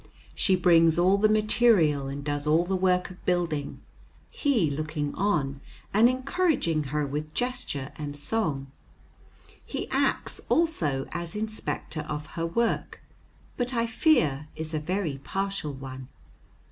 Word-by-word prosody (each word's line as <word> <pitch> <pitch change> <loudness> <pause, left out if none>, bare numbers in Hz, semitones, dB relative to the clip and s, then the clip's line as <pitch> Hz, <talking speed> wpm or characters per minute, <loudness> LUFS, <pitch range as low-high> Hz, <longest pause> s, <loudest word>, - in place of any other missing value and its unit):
She 190 - +2
brings 165 -3 +5
all 185 +3 +4
the 215 +1 +4
material 210 -10 +4
and 140 +1 -5
does 145 0 -2
all 160 +3 +4
the 190 +2 0
work 185 0 +1
of 180 - -14
building, 170 -5 -1 0.5
he 230 - +1
looking 150 0 -3
on 140 -9 0 0.3
and 220 +4 +6
encouraging 260 - 0
her 150 +2 -1
with 150 +2 -5
gesture 245 - -2
and 145 -1 -4
song. 145 -5 -1 1.0
He - - -5
acts - - 0
also 160 - +1
as 170 0 -4
inspector 215 -6 -3
of 150 0 -3
her 165 0 -2
work, 230 +8 -1 0.6
but 245 0 -2
I 230 0 +2
fear 165 - +2
is 160 +1 -5
a 155 - 0
very 165 -3 -2
partial 195 -6 -2
one. 130 -1 -8
165 Hz, 135 wpm, -27 LUFS, 150-215 Hz, 1.0 s, and